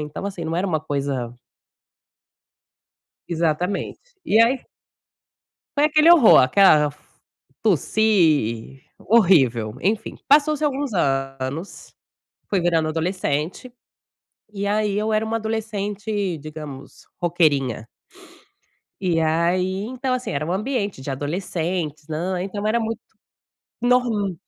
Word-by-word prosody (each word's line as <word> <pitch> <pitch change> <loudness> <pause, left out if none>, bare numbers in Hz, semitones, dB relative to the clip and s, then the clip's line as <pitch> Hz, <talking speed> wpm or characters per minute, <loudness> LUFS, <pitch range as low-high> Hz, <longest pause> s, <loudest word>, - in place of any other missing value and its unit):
então 150 +4 -6
assim 185 -5 -5
não 165 - -2
era 185 +3 0
uma 160 -4 -1
coisa 140 -5 -3 1.9
Exatamente. 170 +3 -1 0.3
E 225 -7 +3
aí 245 +3 +3 1.1
foi 290 - +3
aquele 310 +2 +4
horror, 325 -10 +8
aquela 150 +2 +5 0.7
tossi, 155 - +1 0.2
horrível, 135 - +3
enfim, 215 +4 -1
passou-se 300 +1 +4
alguns 285 -3 -1
anos, 135 +1 -3 0.6
fui 195 -3 +2
virando 165 -2 +1
adolescente, 165 - -2 0.8
e 200 0 -3
aí 205 0 0
eu 215 +1 0
era 215 +1 +1
um 220 - -4
adolescente 210 -3 -3
digamos 150 -2 -10 0.2
roqueirinha. 145 -10 +1 1.1
E 175 -4 +1
aí 175 +4 0
então 255 +3 -3
assim 255 0 -3
era 145 +2 -2
um 170 - -2
ambiente 205 - -2
de 135 +1 -4
adolescentes 160 +1 -3
nã 175 +4 -2
então 205 +2 -5
era 225 +2 +2
muito 225 0 -3 0.8
norm 235 -6 +1
185 Hz, 110 wpm, -22 LUFS, 150-220 Hz, 1.9 s, horror